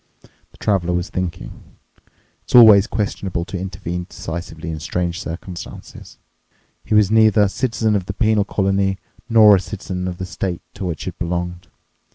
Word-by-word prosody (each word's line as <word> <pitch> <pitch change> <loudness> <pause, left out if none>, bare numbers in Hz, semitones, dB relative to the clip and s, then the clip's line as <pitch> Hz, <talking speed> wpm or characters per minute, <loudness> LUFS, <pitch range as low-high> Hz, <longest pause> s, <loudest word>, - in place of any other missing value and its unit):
The - - -22
Traveler 90 -4 0
was 90 +1 -3
thinking: 90 -1 -6 0.6
it's - - -3
always 110 -4 +8
questionable 100 -6 -3
to 95 - -5
intervene 90 -1 -5
decisively 80 0 -6
in 80 - -5
strange 85 +3 -3
circumstances. 85 0 -9 0.7
He 110 - -1
was 105 -1 +4
neither 110 -1 +5
a 100 - +2
citizen 110 -1 0
of 95 -3 -2
the 100 - -3
penal 110 -1 +2
colony 95 -1 0 0.3
nor 110 -3 +7
a - - -1
citizen 95 -1 -5
of 90 -1 -5
the 95 - -4
state 90 -1 -4
to 95 - -6
which 80 -5 -4
it - - -6
belonged. 90 0 -3
95 Hz, 160 wpm, -20 LUFS, 90-105 Hz, 0.7 s, always